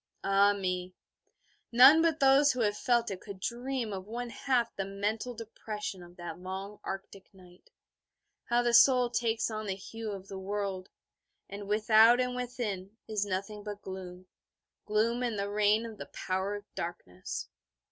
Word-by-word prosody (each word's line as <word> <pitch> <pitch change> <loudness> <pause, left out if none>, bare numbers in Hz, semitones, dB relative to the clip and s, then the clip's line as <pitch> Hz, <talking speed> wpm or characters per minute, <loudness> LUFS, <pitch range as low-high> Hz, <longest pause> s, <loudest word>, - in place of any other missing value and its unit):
Ah 200 +1 +4
me, 185 -2 -3 0.8
none 265 +7 +8
but 325 -2 +2
those 275 +1 +6
who 250 - -2
have 205 -2 +2
felt 235 -1 +1
it 185 - -6
could 200 -2 -9
dream 240 +1 -3
of 190 0 -6
one 240 +2 -5
half 245 -3 0
the 195 - -2
mental 210 +5 -3
depression 215 -3 -6
of 175 0 -14
that 175 -1 -7
long 190 +3 -6
Arctic 195 0 -7
night; 180 -1 -18 0.8
how 240 +1 +2
the 240 -1 +1
soul 245 0 +6
takes 230 -1 0
on 215 -1 -4
the 190 - -1
hue 225 +3 -7
of 195 -2 -7
the 195 -1 -7
world; 195 -1 -3 0.6
and 200 0 -8
without 220 +3 +5
and 250 0 0
within 225 -5 -4
is 210 -2 -1
nothing 200 +2 -3
but 205 -1 -7
gloom, 185 -1 -8 0.6
gloom, 225 +3 +1
and 235 -4 -1
the 200 0 -2
reign 210 +2 +3
of 225 -2 -9
the - - -7
Power 190 +2 -2
of 205 0 -8
Darkness. 95 - -6
210 Hz, 165 wpm, -30 LUFS, 195-235 Hz, 0.8 s, none